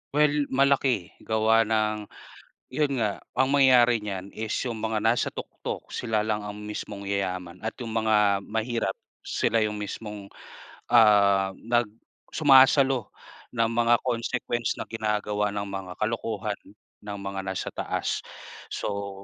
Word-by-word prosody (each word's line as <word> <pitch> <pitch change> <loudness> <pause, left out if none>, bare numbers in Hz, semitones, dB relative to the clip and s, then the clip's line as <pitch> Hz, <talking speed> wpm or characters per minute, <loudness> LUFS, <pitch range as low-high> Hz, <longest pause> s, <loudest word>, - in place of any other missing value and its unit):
Well, 150 -1 +3
malaki, 135 -8 +2
gawa 110 0 +2
ng 110 -1 0 0.6
yon 140 0 0
nga, 105 -2 -1 0.2
ang 130 +1 +2
mangyayari 125 -4 +5
niyan 100 -2 -6
is 110 -1 -3
yung 115 -3 -4
mga 110 -1 -1
nasa 115 +2 +2
tuktok - - -6
sila 110 -3 -1
lang 105 -1 -1
ang 105 - -6
mismong 105 -1 -6
yayaman 95 -3 -3
at 110 +1 -4
yung 115 - -5
mga 105 -3 +3
mahirap 110 -2 -1 0.2
sila 115 - 0
yung 105 -1 0
mismong, 105 -1 -7 0.6
ah, 100 -4 +5
nag 120 +1 0 0.5
sumasalo 135 -3 +5 0.5
ng 115 -1 +2
mga 120 0 +4
consequence 120 -1 -1
na - - -4
ginagawa 105 -2 -1
ng 100 0 -3
mga 95 -1 -5
kalokohan 110 -2 -2 0.4
ng 105 -1 -7
mga 100 0 -5
nasa 95 0 -3
taas - - -2 0.5
so 100 -1 -4
110 Hz, 130 wpm, -26 LUFS, 100-120 Hz, 0.6 s, mangyayari